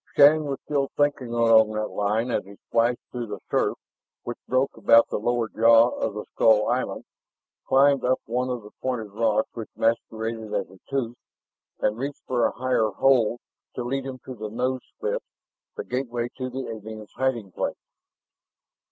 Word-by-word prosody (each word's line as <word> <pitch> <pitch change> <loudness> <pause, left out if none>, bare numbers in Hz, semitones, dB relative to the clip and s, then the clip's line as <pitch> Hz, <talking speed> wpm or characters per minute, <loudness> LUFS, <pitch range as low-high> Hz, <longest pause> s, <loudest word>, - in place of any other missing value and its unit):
Shann 150 +2 +7
was 140 -2 -2
still 140 -2 0
thinking 145 -3 +1
along 115 -2 +4
that 110 0 -2
line 110 +4 0
as - - 0
he 100 +2 -13
splashed 115 +4 +1
through 120 -2 -4
the 105 -2 -6
surf - - +1 0.5
which 120 - -5
broke 130 +2 +1
about 115 0 +5
the - - -2
lower 120 +1 0
jaw 115 +2 +5
of 105 - -3
the 105 - -5
skull 110 -1 +4
island, - - -1 0.6
climbed 140 0 +4
up 130 +1 +2
one 125 +3 -1
of 125 -3 -3
the 105 - -12
pointed 120 -5 -3
rocks 110 0 +1
which 115 -2 -7
masqueraded 115 -1 -1
as - - -2
a 95 - -16
tooth, 125 -4 -2 0.6
and 105 +2 0
reached 140 +2 -5
for 120 -2 +2
a - - -4
higher 125 -3 +1
hold 120 +1 +2 0.3
to 125 - -3
lead 135 +2 -2
him 130 -1 -6
to 130 - -6
the 110 -3 -6
nose 125 +3 -1 0.2
slit, 470 +3 -1 0.6
the - - -3
gateway 120 -2 -3
to 130 -1 -4
the 130 +1 -5
alien's 110 -1 -8
hiding 120 -7 -1
place. - - -3
120 Hz, 175 wpm, -25 LUFS, 110-130 Hz, 0.6 s, Shann